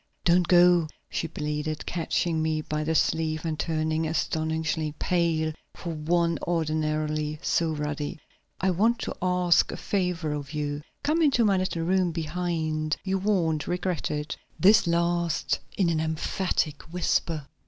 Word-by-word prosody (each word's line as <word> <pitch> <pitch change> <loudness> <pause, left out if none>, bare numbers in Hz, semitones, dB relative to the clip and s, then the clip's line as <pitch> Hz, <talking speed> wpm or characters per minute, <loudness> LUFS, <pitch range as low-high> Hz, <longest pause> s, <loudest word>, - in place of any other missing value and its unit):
"Don't 175 0 +4
go," 175 -2 +6 0.2
she 165 - -1
pleaded, 150 0 -3
catching 165 -1 0
me 155 -1 0
by 150 0 -3
the 160 +1 0
sleeve 160 0 +1
and 155 -2 -2
turning 160 0 0
astonishingly 160 -1 -1
pale 165 -3 +1 0.2
for 170 -2 -5
one 170 +2 +1
ordinarily 155 -2 -1
so 165 -1 +1
ruddy. 150 0 -3 0.4
"I 190 +1 +2
want 220 +7 +3
to - - -3
ask 180 -1 +3
a - - -5
favor 180 -5 -1
of 145 0 -5
you. 145 -1 -2 0.2
Come 315 +3 +2
into 270 -7 +4
my 200 -2 +3
little 185 -3 -1
room 185 0 +2
behind. 160 -1 -2
You 190 0 0
won't 170 -7 +1
regret 180 -1 -1
it." 150 0 -3 0.2
This 205 0 +6
last 170 -1 +1 0.2
in 190 - +3
an 160 -2 +1
emphatic 160 -1 -1
whisper. 165 -3 0
160 Hz, 145 wpm, -27 LUFS, 155-180 Hz, 0.4 s, go